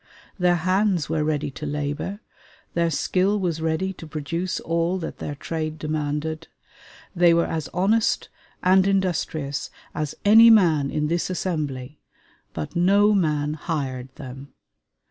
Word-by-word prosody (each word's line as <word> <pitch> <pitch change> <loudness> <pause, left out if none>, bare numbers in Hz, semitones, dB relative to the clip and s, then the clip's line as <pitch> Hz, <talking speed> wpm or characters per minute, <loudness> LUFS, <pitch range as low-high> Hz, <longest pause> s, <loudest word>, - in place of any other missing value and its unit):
Their 180 -1 +4
hands 185 -1 +1
were 160 -1 0
ready 150 -1 -1
to 150 - -7
labor; 150 +8 -3 0.5
their 170 0 +1
skill 190 +6 +1
was 170 -4 -2
ready 160 +4 -1
to 165 - -11
produce 165 +4 -3
all 170 +2 0
that 165 - -6
their 145 - -4
trade 155 +2 -4
demanded. 155 +1 -3 0.7
They 170 -1 +5
were 170 - +3
as 160 -2 -3
honest 210 +5 +1 0.3
and 185 +1 +5
industrious 165 -7 -1 0.2
as 150 -2 -3
any 225 +3 +8
man 165 -10 +5
in 150 0 -1
this 170 +3 -1
assembly, 150 -7 -3 0.5
but 80 -2 -6
no 200 +4 +4
man 150 -6 +1
hired 135 -5 -4
them. 135 -1 -10
160 Hz, 135 wpm, -24 LUFS, 150-185 Hz, 0.7 s, any